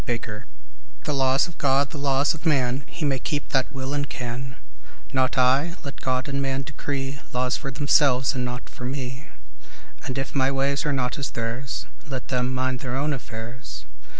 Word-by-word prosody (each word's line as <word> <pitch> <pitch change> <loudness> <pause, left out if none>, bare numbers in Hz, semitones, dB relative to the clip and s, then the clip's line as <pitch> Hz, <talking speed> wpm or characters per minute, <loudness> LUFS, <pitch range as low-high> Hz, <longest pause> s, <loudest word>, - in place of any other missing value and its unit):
Housman 120 -1 0
XII 105 -2 -6 0.6
THE 150 - 0
laws 135 +1 +4
of 170 - -12
God, 140 0 +3
the 150 - -5
laws 140 0 +3
of 160 - -9
man, 135 -3 +3
He 160 - -3
may 135 -2 +2
keep 145 +3 -2
that 130 -2 +2
will 135 0 -3
and 145 -1 0
can; 125 +2 -4 0.6
Not 130 +1 +2
I: 135 +7 +4
let 140 - -6
God 130 0 +1
and 140 0 0
man 135 0 0
decree 140 -1 -3
Laws 125 +1 +1
for 135 - -3
themselves 135 -2 +4
and 125 -2 -1
not 125 0 -3
for - - -10
me; 130 +1 -4 0.8
And 130 - -3
if 135 0 -2
my 135 -1 +3
ways 140 +2 +1
are - - +3
not 130 -1 0
as 140 - -1
theirs 120 +4 -3 0.2
Let 130 -3 -4
them 125 -1 +1
mind 130 0 0
their 125 0 -3
own 145 +2 +1
affairs. 120 0 -6
135 Hz, 190 wpm, -26 LUFS, 125-140 Hz, 0.8 s, laws